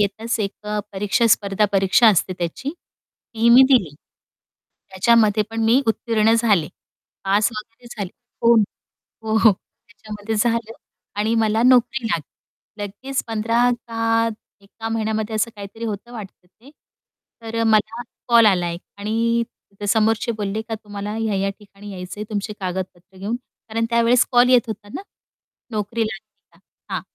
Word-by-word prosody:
येताच 220 +3 -1
एक 205 +1 -5
अ, 210 0 -1
परीक्षा 205 +4 +1
स्पर्धा 205 -1 +2
परीक्षा 195 +4 +5
असते 185 -2 +2
त्याची, 175 - -3 0.6
ती 230 +1 +2
मी 250 +3 +9
दिली. 195 - +3 1.0
त्याच्यामध्ये 215 +2 +3
पण 225 0 -3
मी 235 +4 +5
उत्तीर्ण 225 0 +2
झाले, 210 -9 +2 0.6
पास 200 +2 +3
वगैरे 225 +3 -10
झाले 200 -4 -4 0.3
हो, 235 0 +6 0.7
हो, 220 0 0
हो, 220 -2 +6 0.4
त्याच्यामध्ये 210 +1 -6
झालं 230 0 0 0.5
आणि 220 +2 +1
मला 220 +1 +2
नोकरी 250 0 +4
लागली. 205 +4 -7
लगेच 260 +7 -4
15 230 +2 +1 0.2
का 230 0 +1 0.3
एका 225 +3 -8
महिन्यामध्ये 220 -1 -2
असं 215 +2 0
काहीतरी 205 +3 -8
होतं 220 +2 -5
वाटतं 200 -5 -10
ते, 235 +9 -20 0.7
तर 225 0 -5
अ, - - +2
मला 220 +1 +2 0.3
कॉल 235 -1 +6
आला 180 -4 +3
एक 170 - -6 0.2
आणि 230 +3 0 0.5
समोरचे 225 +2 +2
बोलले 210 0 -3
का, 225 0 -5
"तुम्हाला 205 -1 -6
ह्या-ह्या 205 -3 -1
ठिकाणी 205 0 -13
यायचंय 185 +3 -7
तुमचे 210 0 -3
कागदपत्र 185 0 -5
घेऊन." 205 +5 -2 0.3
कारण 225 +1 -1
त्यावेळेस 235 +1 +4
कॉल 245 +1 +5
येत 245 -2 +5
होता 210 -1 -7
ना, - - -4 0.7
नोकरी 215 +1 -2
लागली 215 -2 -9
का - - -24 0.4
हां, - - -1
220 Hz, 145 wpm, -21 LUFS, 205-230 Hz, 1.0 s, मी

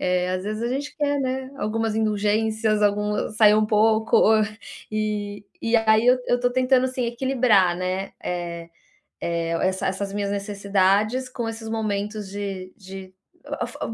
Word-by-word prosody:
eh, 180 0 +1
às 185 - -2
vezes 215 +3 -4
a 235 - 0
gente 275 +4 -3
quer, 285 -2 0
né, 260 0 -3
algumas 220 +1 -1
indulgências, 215 0 +1
algum 210 0 +1
sair 215 -1 +5
um 215 0 +3
pouco. 220 +1 +3
Ou, 220 +1 +5
eh, 210 - -1 0.4
e 215 +1 -2
aí 220 +1 +5
eu 250 +1 +6
eu 245 0 +1
tô 245 - +2
tentando 255 +1 +3
assim 255 -1 -2
equilibrar, 235 -7 +2
né, 185 +2 -3
eh 170 -1 -4 0.5
eh, 170 -1 -2 0.2
essa 190 0 -2
essas 195 +1 -3
minhas 200 -1 -2
necessidades 200 +4 +1
com 235 -2 -4
esses 225 0 -7
momentos 210 -1 -2
de 195 -2 -5
de 190 -1 -10 0.3
a - - -4
a - - -3
a - - -8
fo - - -12
210 Hz, 170 wpm, -23 LUFS, 195-225 Hz, 0.5 s, eu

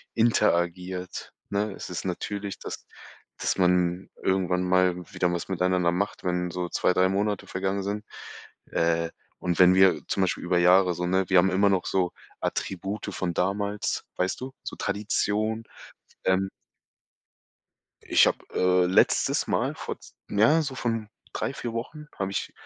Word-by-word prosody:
interagiert, 90 -5 0 0.2
ne? 100 0 -1
Es - - -8
ist 90 - -5
natürlich, 100 +2 -4
dass - - -7 0.5
dass - - -1
man 90 0 +2
irgendwann 90 -1 +1
mal 90 -1 +3 0.2
wieder 90 -1 +1
was 85 - -3
miteinander 90 -1 +2
macht, 100 +4 -2
wenn 90 -1 -1
so 90 0 -3
2, - - +2
3 95 +1 +4
Monate 100 +1 -1
vergangen 95 +1 -2
sind. 105 +2 -3 0.7
Äh, 85 0 +1 0.3
und 90 -1 -1
wenn 90 0 +7
wir 95 -1 +5
zum 95 - 0
Beispiel 90 -3 0
über 90 0 +1
Jahre 90 +1 +5
so 90 - -2
ne, 95 0 +1
wir 95 - +5
haben 95 +2 +3
immer 100 +2 +4
noch 95 -2 +1
so 90 -2 +1 0.3
Attribute 95 +3 -3
von 90 -2 -2
damals, 100 +3 -1
weißt 90 +5 -1
du, 130 +1 -6
so - - -6
Tradition. 105 +2 -1 0.6
Ähm 95 +1 +2 1.6
Ich - - +5
habe, - - +1 0.2
äh, 90 0 +3
letztes 90 - +3
Mal - - 0
vor - - -6
z - - -16 0.2
ja, 145 +11 +4
so 135 -3 -4
von 115 -4 -2 0.3
3, - - -2
4 120 -3 -5
Wochen, 150 +6 -6
habe 95 -1 -2
ich - - -3
95 Hz, 155 wpm, -26 LUFS, 90-100 Hz, 1.6 s, wenn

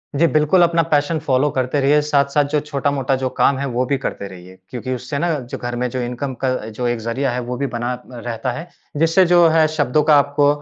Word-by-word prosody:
जी। 165 +4 +4
बिल्कुल 155 +4 +3
अपना 170 0 +3
passion 150 +2 +2
follow 145 -1 +1
करते 130 +2 -1
रहिए, 145 +2 +4
साथ-साथ 145 0 +2
जो 150 - +2
छोटा-मोटा 140 -2 -1
जो 130 - +1
काम 140 - +4
है 140 - -2
वो 125 0 -1
भी 140 +2 0
करते 115 -6 -5
रहिए। 95 0 -13
क्योंकि 130 +1 -4
उससे 130 +4 -5
ना 175 +2 0
जो 125 -1 -7
घर 120 0 -5
में 125 +1 -1
जो 125 +1 -3
इनकम 125 +3 -4
का 130 - +2 0.2
जो 120 +3 -3
एक 120 -1 -1
ज़रिया 120 +4 -2
है 125 - -2
वो 125 - -3
भी 140 +2 -1
बना 120 0 -3
अ, 125 - -8 0.2
रहता 120 +2 -3
है। 160 +8 -7 0.3
जिससे 165 +4 +4
जो 175 -1 +5
है 160 -1 +4
शब्दों 150 -1 +1
का 150 0 +5
आपको 145 0 +2
140 Hz, 235 wpm, -19 LUFS, 125-150 Hz, 0.3 s, जो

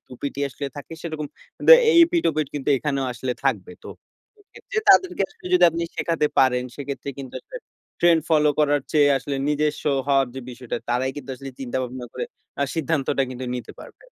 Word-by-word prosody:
টুপিটি 140 +2 -6
আসলে 140 +1 -6
থাকে 145 +3 -9
সেরকম 155 -3 -4 0.4
দে 485 - +12 0.2
এই 340 - +5
এপিঠ-ওপিঠ 165 - 0
কিন্তু 145 0 -4
এখানেও 140 -2 -1
আসলে 125 +1 -3
থাকবে। - - 0
তো - - -8 0.5
সে 415 - -27
ক্ষেত্রে 485 -3 -5
তাদেরকে 370 - +5
আসলে - - -14
যদি 180 -1 +6
আপনি 170 +1 -3
শেখাতে 165 -3 +1
পারেন 125 -1 +3
সেক্ষেত্রে 140 0 -5
কিন্তু 130 -2 -8
আসলে - - -9 0.4
ট্রেন্ড 170 -2 +5
ফলো 150 -1 +4
করার 145 -1 +3
চেয়ে 145 -2 +5
আসলে 140 +1 -4
নিজস্ব 150 0 0 0.2
হওয়ার 135 -2 +3
যে 130 - -5
বিষয়টা 125 -1 -5
তারাই 130 +2 +1
কিন্তু 135 -2 -7
আসলে 135 0 -8
চিন্তা 130 0 -4
ভাবনা 125 0 -6
করে - - -3 0.4
আ - - +4
সিদ্ধান্তটা 155 -4 0
কিন্তু 130 0 -6
নিতে 125 - -6
পারবে। - - -14
145 Hz, 180 wpm, -23 LUFS, 130-160 Hz, 0.5 s, দে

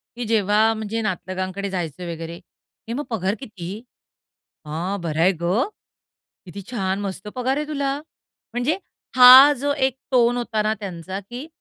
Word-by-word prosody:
की 245 - -4
जेव्हा 210 -2 +2
म्हणजे 220 +1 -4
नातलकांकडे 185 0 -3
जायचे 175 -1 -4
वगैरे, 165 +1 -7 0.5
"ए 230 - -3
मग 290 +4 -3
पगार 200 -2 -1
किती? 210 -9 -8 1.0
हां, 175 +6 -3
बरं 160 -2 -2
आहे 185 +3 +5
गं! 200 - +1 0.8
किती 195 +3 -8
छान, 195 -4 -1
मस्त 195 0 -5
पगार 260 +2 0
आहे 300 - -2
तुला!" 280 -2 -1 0.6
म्हणजे 250 +9 0 0.4
हा 260 +3 +10
जो 285 0 +1
एक 265 -1 -4
टोन 245 -1 +3
होता 235 -3 -1
ना 215 +1 +1
त्यांचा 185 0 -6
की 250 +5 -6
210 Hz, 150 wpm, -22 LUFS, 185-245 Hz, 1.0 s, हा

